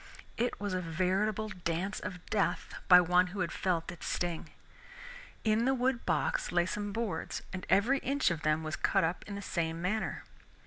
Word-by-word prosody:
It 240 +2 -1
was 205 -2 -2
a 185 - 0
veritable 190 +6 0
Dance 180 +1 -2
of 180 -2 -7
Death 205 -2 0
by 180 -1 +10
one 180 +1 +4
who 185 +1 -4
had 175 - -1
felt 175 -3 -1
its 175 - -8
sting. 175 -2 -2 0.9
In 220 +1 +3
the 265 +1 +3
wood 250 -1 0
box - - 0
lay 175 0 +3
some 205 +2 -3
boards, 210 -6 -3
and 185 -1 -5
every 235 +8 +4
inch 275 -7 +1
of 165 -2 -3
them 155 +1 +1
was 155 0 -2
cut - - +2
up 165 +2 -1
in 200 - -5
the 200 - -6
same 165 -3 -2
manner. 200 +6 -1
185 Hz, 185 wpm, -32 LUFS, 175-215 Hz, 0.9 s, by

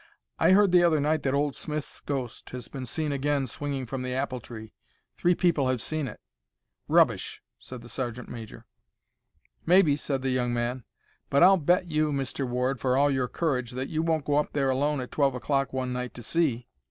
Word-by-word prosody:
"I - - +5
heard 200 -1 +5
the 180 -1 +6
other 165 -3 +4
night 155 +2 +1
that 135 0 0
old 145 0 +1
Smith's 155 -1 -5
ghost 130 -5 -5
has 125 -2 -7
been 130 -3 -7
seen 155 +4 -2
again 140 0 0
swinging 135 +1 -4
from 130 +2 -4
the 125 0 -3
apple 130 -1 -2
tree. 110 -2 -10 0.4
Three 175 0 +2
people 165 -7 +2
have 130 -2 0
seen 155 +4 -2
it." - - -9 0.7
"Rubbish!" - - +2 0.2
said 125 -2 -9
the - - -11
sergeant 125 -1 -4
major. 115 -3 -9 1.0
"Maybe," 170 -4 +5
said 135 -2 -3
the 135 - 0
young 125 -1 0
man; 120 +1 -2 0.4
"but 140 +4 +4
I'll 190 +1 +7
bet 175 +2 +1
you, 155 0 +1
Mr. 135 -1 -2
Ward, 125 +1 -1
for 130 +1 +1
all 145 +1 +4
your 130 -2 0
courage, 125 -6 -2
that 130 +2 -4
you 155 - -1
won't 160 -3 0
go 145 0 +1
up 150 - 0
there 135 -2 +1
alone 145 +1 0
at 125 - -7
twelve 140 -3 +2
o'clock 135 +1 0
one 130 -1 -2
night 125 0 -4
to 120 - -8
see." 130 -6 0
135 Hz, 200 wpm, -27 LUFS, 125-150 Hz, 1.0 s, I'll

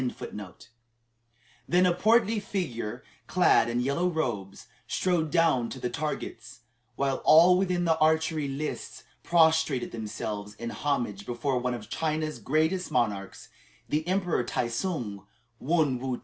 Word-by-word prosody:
(1) 105 -5 -5 1.2
Then 180 +1 +4
a 180 - +4
portly 220 +3 +3
figure, 125 - -4 0.2
clad 180 -10 +4
in 120 +1 0
yellow 140 +8 0
robes, 120 - -3 0.2
strode 175 -4 0
down 155 -8 +2
to 130 - -7
the 125 -1 -3
targets, 120 -5 -5 0.3
while 135 -1 0
all 170 +4 +7
within 180 -1 +1
the 160 -1 +2
archery 155 -1 +2
lists 140 +3 -5 0.2
prostrated 160 -6 +3
themselves 105 -2 -5
in 115 +2 -5
homage 120 -9 -2
before 125 +2 -1
one 125 0 -1
of 110 -3 -9
China's 155 -3 -2
greatest 160 - 0
monarchs 100 -6 -2 0.4
the 155 +2 -1
Emperor 180 -7 +1
Tai 120 0 -2
tsung, 115 - -3 0.3
Wun 150 -4 +1
woo 130 -1 -3
ti. - - -15
145 Hz, 135 wpm, -28 LUFS, 120-170 Hz, 1.2 s, all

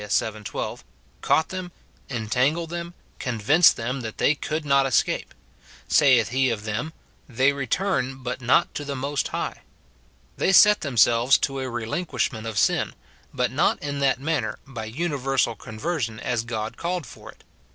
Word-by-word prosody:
vii. 105 +1 -1
12, - - -5 0.4
caught 160 - +2
them, 185 -1 -5 0.4
entangled 130 +8 0
them, 170 0 -5 0.2
convinced 125 +8 +4
them 125 +3 -3
that 110 -2 -6
they 145 - +3
could 155 +1 -4
not 140 -1 +3
escape; 130 - 0 0.6
saith 130 - +4
he 130 +2 +2
of 110 -3 -3
them, 110 +9 -3 0.2
" - - -35
They 135 +2 +5
return, 135 - -1
but 125 +1 -4
not 130 +7 +3
to 145 - -4
the 140 -1 -4
Most 140 +2 -2
High - - -4 0.2
;" - - -34
— - - -35
they 190 - +2
set 210 +2 +7
themselves 120 -2 +4
to 135 -1 -5
a 130 -1 -3
relinquishment 120 -1 -2
of 110 -2 -5
sin, - - +1 0.4
but - - -1
not - - +2
i*Q 145 -1 -3
that 135 -2 +2
manner, 145 -5 -1
by 120 -5 -7
universal 135 -2 -1
conversion, 110 +1 -4
as 120 -2 -1
God 110 -2 -4
called 175 -2 -2
for 115 - -12
it. - - -24
130 Hz, 165 wpm, -24 LUFS, 115-150 Hz, 0.6 s, set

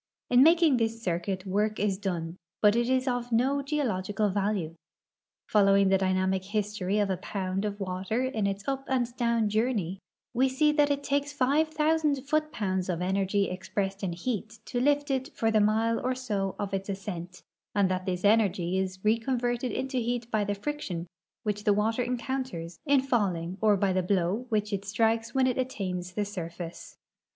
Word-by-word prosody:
In 245 +1 +7
making 325 -2 +6
this 225 -1 0
circuit 185 -1 -2
work 210 +3 0
is 195 -2 0
done, 175 -4 -3 0.2
but 210 0 +5
it 240 +1 +1
is 260 +1 +1
of 245 -1 -1
no 265 +5 +2
geo 295 +1 -1
logical 205 0 0
value. 195 -4 -1 0.7
Following 195 -2 +4
the 195 - +5
dynamic 190 0 +1
history 210 -1 -1
of 205 -2 +1
a 185 - -1
pound 190 +1 -3
of 205 0 -3
water 190 +5 -2
in 225 -6 0
its 200 +3 -4
up 270 0 -1
and 245 -2 0
down 235 -3 +1
journey, 210 -4 0 0.3
we 260 +2 +3
see 300 +4 +3
that 295 -1 +3
it 285 0 0
takes 285 +1 0
five 285 +3 +2
thousand 305 -3 +1
foot 305 +1 +1
pounds 190 -3 -2
of 170 -2 -1
energy 195 +2 +1
expressed 195 +1 -3
in 185 -4 -2
heat 220 +4 -4
to 245 - -2
lift 290 +1 +2
it 265 +1 -1
for 225 0 +2
the 215 -1 +4
mile 220 +2 +2
or 255 +1 0
so 205 -7 -2
of 200 -1 -4
its 195 +1 -2
ascent, 180 -2 -6 0.3
and 200 -2 +4
that 185 0 -2
this 180 -1 -2
energ}'' 195 -4 +3
is 185 0 -3
reconverted 240 +2 +1
into 260 +4 -2
heat 240 0 -2
b}' 215 -1 +2
the 205 0 -1
friction 200 - -4 0.4
which 210 -1 -2
the 205 - +4
water 220 +4 +1
encounters 245 -8 -3
in 280 -1 +5
falling 190 -9 0
or 210 -2 +4
by 195 -1 +1
the 185 - +2
blow 190 +5 0
which 210 -2 0
it 195 0 -2
strikes 225 +3 0
when 265 -1 +4
it 255 0 0
attains 185 -8 -3
the 205 +1 -1
surface. 170 -3 -7
210 Hz, 185 wpm, -28 LUFS, 190-250 Hz, 0.7 s, In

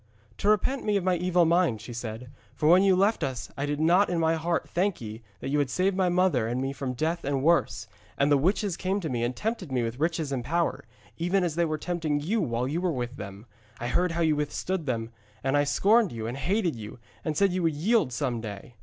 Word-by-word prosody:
'To 205 - +2
repent 240 +6 +2
me 210 -1 +2
of 195 - -2
my 185 0 +2
evil 180 0 +3
mind,' 170 -8 +2
she 120 - -9
said. 120 +1 -6 0.2
'For 150 - 0
when 180 +3 +7
you 195 -1 +4
left 200 0 +2
us 130 -3 -4
I 140 +2 -2
did 145 0 -2
not 175 +6 +4
in 175 - 0
my 160 0 +2
heart 165 +1 -1
thank 190 +2 0
ye 110 0 -7 0.2
that - - -4
you 145 +1 +1
had 140 -2 +1
saved 185 +6 +1
my 185 -2 +2
mother 175 -10 +2
and 120 +2 -1
me 135 +1 -2
from 135 -2 -4
death 160 +7 -1
and 135 -1 -1
worse. 160 -6 +2 0.3
And 140 +1 +2
the 145 - +6
witches 190 +4 +1
came 190 +2 -1
to 160 - -3
me 120 -2 -1
and 120 +1 -1
tempted 210 - -3
me 125 -2 +1
with 115 +2 -4
riches 160 -2 -1
and 130 -3 -2
power, 170 +6 -1 0.3
even 180 +3 +1
as 170 -3 0
they 170 +2 +1
were 155 -1 -1
tempting 160 -3 -1
you 200 +9 0
while 125 -5 -1
you 160 +6 -2
were 180 -2 +1
with 125 -2 -4
them. 100 +2 -8 0.3
I 120 - -3
heard 180 +4 +1
how 170 - -1
you 160 -2 +3
withstood 150 +3 -2
them, 115 -2 -2 0.3
and 135 +1 +1
I 145 0 +3
scorned 205 +8 +3
you 115 -2 -5
and 120 +2 -3
hated 175 - 0
you 110 0 -8 0.3
and 155 -2 -2
said 195 0 +3
you 185 - 0
would 165 -3 +1
yield 200 - +2
some 120 -2 -2
day. 105 +1 -8
155 Hz, 250 wpm, -27 LUFS, 125-180 Hz, 0.3 s, when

